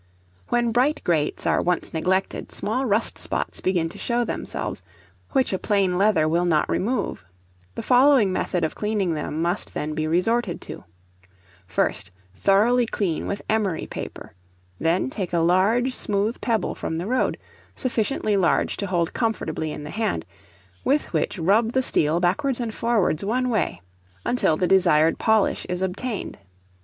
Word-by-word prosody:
When 240 -1 +2
bright 260 +6 +2
grates 160 -4 0
are - - +2
once 180 0 -1
neglected, 185 +4 -1
small 250 +6 -2
rust 215 +1 0
spots - - -3
begin 180 -3 +1
to - - -11
show 240 0 0
themselves, - - -4 0.5
which 265 -7 +2
a 190 - -1
plain 195 -4 +1
leather 190 -5 +3
will 170 +3 +1
not 160 -3 +2
remove; 240 - -1 0.5
the - - -4
following 250 -6 +5
method 180 -1 -1
of 160 - 0
cleaning 210 -5 -1
them 155 +1 -3
must 175 +4 -2
then 155 +1 -2
be 155 0 -1
resorted 185 +4 +1
to: - - -9 0.8
First, 100 +3 -1 0.3
thoroughly 225 - +3
clean 185 -8 -2
with 200 - -4
emery 210 -6 0
paper; - - -8 0.5
then 170 +10 +1
take 190 -7 -4
a - - +2
large 195 +10 +3
smooth 210 0 -1
pebble 230 -3 0
from 160 - -4
the 170 +2 -3
road, 250 +4 0 0.4
sufficiently 225 -3 0
large 185 -4 +2
to 200 - -3
hold 175 -2 0
comfortably 160 -9 -2
in 150 - -6
the 150 - -7
hand, 215 - -1 0.6
with 290 +3 +1
which - - 0
rub 210 +7 +2
the 260 - +2
steel 160 -6 +2
backwards 235 +10 +1
and 230 -3 -3
forwards 220 -9 +1
one 250 +5 0
way, 165 - -1 0.4
until 205 -10 +2
the 180 - +1
desired 175 -4 +4
polish 220 -2 +2
is 180 +1 -2
obtained. 200 - -4
195 Hz, 155 wpm, -24 LUFS, 170-230 Hz, 0.8 s, following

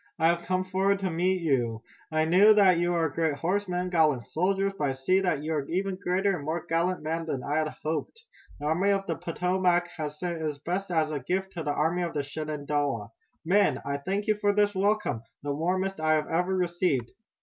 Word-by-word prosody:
I 160 - +4
have 170 0 +1
come 185 0 0
forward 190 +1 +1
to 190 -2 -1
meet 180 +2 0
you! 120 -7 0 0.3
I 155 0 +2
knew 195 +6 +6
that 190 -4 +5
you 175 0 +1
were 165 -1 +2
great 160 0 0
horsemen, 180 +2 -1
gallant 155 -8 +2
soldiers, 195 +3 0
but 145 -7 0
I - - +1
see 135 +9 +2
that 175 -7 0
you 160 +1 -2
are 145 -3 -2
even 190 +2 -1
greater 190 +2 +1
and 155 - -6
more 160 +3 -3
gallant 170 +2 0
men 165 +1 -2
than 135 -5 -3
I 145 +2 -1
had 155 -1 -1
hoped. 160 - -3 0.4
The 145 - -6
Army 170 +6 +2
of 195 -1 +1
the 170 - -1
Potomac 180 0 +1
has 150 -2 -4
sent 170 -1 -3
its 150 -2 -2
best 180 +6 -3
as 160 -3 +1
a 150 - -2
gift 190 +8 -2
to 175 - -5
the 150 - -3
Army 160 +4 +1
of 170 -2 -3
the 145 - 0
Shenandoah. 145 -6 -3 0.3
Men, 200 +5 +3
I 140 0 -1
thank 195 +8 -2
you 215 - +3
for 205 - +4
this 205 0 +2
welcome, 200 - 0 0.2
the 145 0 -1
warmest 185 +5 -1
I 155 0 +2
have 155 -1 -1
ever 180 +3 0
received!" 175 -9 0
170 Hz, 215 wpm, -27 LUFS, 150-185 Hz, 0.4 s, knew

